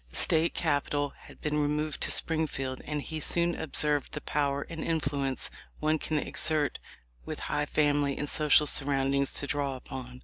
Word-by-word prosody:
The 70 - -14
State 165 - +4
Capital 145 -2 0
had - - -15
been 150 0 0
removed 150 +1 -1
to - - +3
Springfield, 140 -5 -1
and 150 -1 -3
he 160 -1 -5
soon 170 +3 +4
observed 150 -2 -1
the 150 - -4
power 140 -1 -1
and 165 -1 -6
influence 140 -4 -1 0.3
one 155 0 +1
can 155 - -1
exert 150 0 +1 0.4
with - - -6
high 150 0 -1
family 145 -2 +1
and 150 - -3
social 150 0 +4
surroundings 140 -1 +1
to - - +2
draw 140 -1 -1
upon. 125 -1 -8
145 Hz, 165 wpm, -29 LUFS, 140-155 Hz, 0.4 s, State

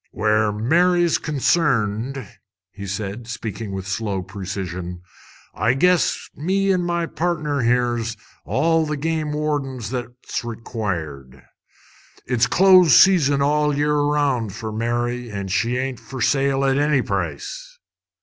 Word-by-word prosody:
"Where 110 0 +1
Mary's 170 +10 +2
concerned," 135 - 0 0.6
said 100 +2 -4
he, - - -11
speaking 115 -2 -5
with 95 -1 -5
slow 100 -1 -2
precision, 90 -2 -6 0.5
"I 115 +6 +1
guess 180 +4 +2
me 195 +5 +1
an' 180 - +1
my 170 -1 -1
pardner 160 -4 -2
here's 120 -2 0 0.3
all 160 +3 +1
the 150 -1 -2
game 155 0 -2
wardens 140 -6 -2
that's 125 -1 -5
required. 85 - -5 0.8
It's 125 -1 +2
close 185 -5 +6
season 145 -7 +5
all 150 0 +1
year 150 +1 +1
round 145 -7 0
fer 110 +1 -6
Mary, 120 +2 -2
an' 100 -2 -5
she 115 +5 0
ain't 130 -1 -3
fer 130 - -9
sale 135 +2 +2
at 135 +1 +2
any 145 -2 +2
price." - - -4
125 Hz, 125 wpm, -21 LUFS, 110-150 Hz, 0.8 s, close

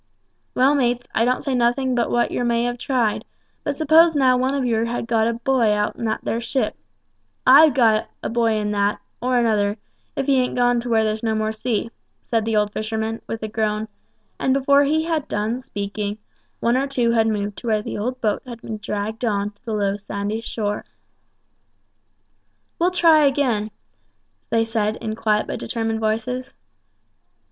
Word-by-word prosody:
"Well, 265 +3 +4
mates, 245 -3 +1
I 230 - +2
don't 250 +1 0
say 275 - -1
nothing 250 +2 +1
but 240 -1 0
what 240 - +1
yer - - -1
may 235 -1 +1
have 245 0 -2
tried; 240 -5 0 0.4
but 290 - -2
suppose 320 +2 +5
now 260 -3 +4
one 260 +2 0
of 270 -2 0
yer 230 -1 +1
had 235 0 -3
got 225 -1 +2
a 235 - 0
boy 235 -1 +1
out 210 0 0
in 230 - -5
that 220 - -1
there 230 - -2
ship 260 +3 -1 0.7
I've 285 +2 +7
got 225 -4 +3
a - - -1
boy 230 -1 +2
in 210 -1 -1
that, 205 0 0 0.2
or 250 +1 +1
another, 215 -3 +1 0.4
if 270 - -1
he 275 -1 +3
ain't 250 -1 0
gone 245 -1 +3
to 240 +1 -5
where 225 -1 +3
there's 215 0 -1
no 220 -1 0
more 215 0 0
sea," 225 0 -2 0.3
said 225 -2 0
the 225 -1 0
old 210 -1 +1
fisherman, 220 +1 -3
with 225 -1 -5
a - - -1
groan; 215 0 -1 0.5
and 265 - +2
before 280 +1 +4
he 310 +3 +1
had 320 -3 -1
done 220 +4 -2
speaking, 205 -3 -4 0.4
one 235 +1 +2
or 275 +1 0
two 245 -4 +1
had 225 -1 +3
moved 205 -2 -2
to 240 - -8
where 215 -2 +1
the 240 +6 -3
boat 215 -4 0
had 240 -2 -8
been 220 - -5
dragged 210 +2 -4
on 205 -3 0
to 205 +4 -38
the 225 - -3
low 200 -1 0
sandy 205 +2 -4
shore. 210 -2 -3 2.0
"We'll 345 +2 +3
try 325 -5 +5
again," 250 -7 0 0.8
they 225 0 +2
said, 220 -2 -1
in 220 -2 -4
quiet 215 -2 +1
but - - -5
determined 225 -1 -2
voices. 225 +4 -2
230 Hz, 190 wpm, -22 LUFS, 215-255 Hz, 2.0 s, I've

